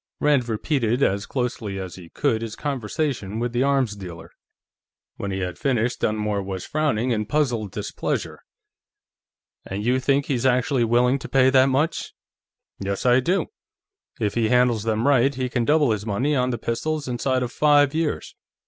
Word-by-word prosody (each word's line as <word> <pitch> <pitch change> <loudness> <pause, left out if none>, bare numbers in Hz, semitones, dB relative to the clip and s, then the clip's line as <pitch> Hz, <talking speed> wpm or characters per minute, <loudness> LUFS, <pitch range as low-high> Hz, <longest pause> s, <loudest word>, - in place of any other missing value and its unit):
Rand 140 -5 +2
repeated, 120 +1 0
as 100 +1 0
closely 120 -6 -3
as 95 -2 -6
he 90 -3 -11
could, 110 +5 0
his 115 -2 -5
conversation 130 -5 -3
with 120 +1 -2
the 120 - +1
arms 135 -5 +1
dealer. 85 -4 -9 0.9
When 100 - -4
he 95 0 -3
had 90 -1 -4
finished, 125 -3 0
Dunmore 105 -1 0
was 95 -1 -5
frowning 135 -6 0
in 105 -2 -1
puzzled 120 -9 0
displeasure. - - -3 1.2
"And 100 +3 -5
you 125 +2 +2
think 140 +1 +1
he's 130 -4 -1
actually 125 0 +2
willing 125 +3 +3
to - - -8
pay 130 -1 +4
that 130 0 +5
much?" 145 +5 -1 0.6
"Yes, 100 +2 -3
I 125 0 +5
do. 180 +9 0 0.7
If 105 -3 0
he 115 -2 +1
handles 125 -2 +3
them 110 +3 0
right, 135 -1 +3
he 130 -1 -2
can 120 -1 0
double 150 -3 +3
his 105 -2 -1
money 120 +8 0
on 125 -1 +1
the 120 - -2
pistols 150 +6 -2
inside 130 +1 0
of 125 - -4
five 145 -1 +4
years. 160 -1 -2
125 Hz, 170 wpm, -23 LUFS, 105-135 Hz, 1.2 s, that